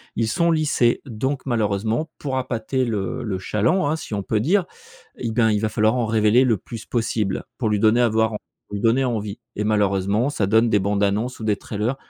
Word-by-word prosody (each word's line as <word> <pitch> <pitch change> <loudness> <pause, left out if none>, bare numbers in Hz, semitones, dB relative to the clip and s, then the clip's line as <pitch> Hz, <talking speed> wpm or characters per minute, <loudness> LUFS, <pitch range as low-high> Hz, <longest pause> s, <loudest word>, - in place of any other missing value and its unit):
Ils 115 - 0
sont 170 +10 +1
lissés 150 -7 +2
donc 130 +3 -3
malheureusement 110 +4 0
pour 135 -2 -3
appâter 125 +1 -2
le 105 -6 -2
le 100 -4 -2
chaland, 110 - +1
hein, 155 - +1
si 160 -9 -6
on 100 - -3
peut 110 - 0
dire. 175 - +2 0.5
Et 115 - -3
ben 110 -1 +3
il 105 - +1
va 110 - 0
falloir 110 +1 +2
en 120 -3 0
révéler 110 +3 +4
le 115 -5 +2
plus 115 +5 -9
possible 110 -4 -1 0.2
pour 110 -4 0
lui 105 - +1
donner 110 +3 +4
avoir 110 -1 +2
pour 105 -1 -11
lui 100 - -4
donner 120 +4 +3
envie. 110 -3 -3 0.2
Et 105 - -2
malheureusement 105 +3 +1
ça 100 -8 0
donne 110 +3 +4
des 105 - +3
bandes 100 +1 0
annonces 105 +6 -1
ou 110 - -7
des 105 -2 +1
trailers 110 +6 -3
110 Hz, 215 wpm, -22 LUFS, 105-125 Hz, 0.5 s, révéler